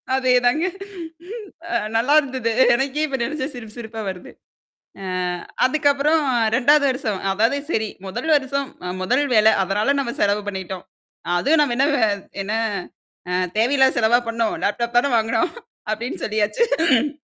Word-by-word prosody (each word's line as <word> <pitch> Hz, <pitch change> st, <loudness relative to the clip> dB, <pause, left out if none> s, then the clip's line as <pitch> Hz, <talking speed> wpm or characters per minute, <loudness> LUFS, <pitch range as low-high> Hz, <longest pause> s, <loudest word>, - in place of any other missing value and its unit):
அதேதாங்க. 255 Hz, +4 st, +2 dB, 1.0 s
அ -, -, -3 dB, 0.2 s
நல்லாயிருந்தது. 260 Hz, -2 st, +2 dB, 0.2 s
எனக்கே 275 Hz, +4 st, -1 dB
இப்போ 270 Hz, -2 st, -3 dB
நினைச்சா 275 Hz, +1 st, -3 dB
சிரிப்பு 225 Hz, -1 st, -10 dB
சிரிப்பா 225 Hz, -1 st, -7 dB
வருது 180 Hz, -1 st, -8 dB, 0.7 s
அ -, -, -6 dB, 0.6 s
அதுக்கப்புறம் 290 Hz, +2 st, +2 dB, 0.3 s
2வது 285 Hz, +3 st, +4 dB
வருஷம் 220 Hz, -7 st, -2 dB
அதாவது 225 Hz, +8 st, +1 dB
சரி 220 Hz, -7 st, 0 dB, 0.2 s
முதல் 195 Hz, +12 st, -5 dB
வருஷம் 275 Hz, 0 st, -2 dB, 0.2 s
அ 180 Hz, -, -3 dB
முதல் 250 Hz, +9 st, +2 dB
வேலை 215 Hz, 0 st, +6 dB
அதனால 210 Hz, +8 st, +1 dB
நம்ம 235 Hz, -3 st, -3 dB
செலவு 205 Hz, 0 st, +2 dB
பண்ணிட்டோம். 190 Hz, -2 st, -5 dB, 0.5 s
அதுவும் 300 Hz, -, +3 dB
நம்ம 245 Hz, -5 st, 0 dB
என்ன 275 Hz, -, +4 dB
வ -, -, -1 dB, 0.4 s
என்ன 205 Hz, +2 st, -4 dB, 0.8 s
அ -, -, -2 dB, 0.3 s
தேவையில்லாத 265 Hz, +3 st, +3 dB
செலவா 235 Hz, +1 st, +4 dB
பண்ணோம், 230 Hz, -1 st, -1 dB
லேப்டாப் 235 Hz, +3 st, -1 dB
தான 270 Hz, +1 st, +1 dB
வாங்கினோம் 225 Hz, +8 st, 0 dB, 0.4 s
அப்படின்னு 235 Hz, +4 st, -4 dB
சொல்லியாச்சு. 285 Hz, -, +1 dB
245 Hz, 130 wpm, -21 LUFS, 220-280 Hz, 1.0 s, வேலை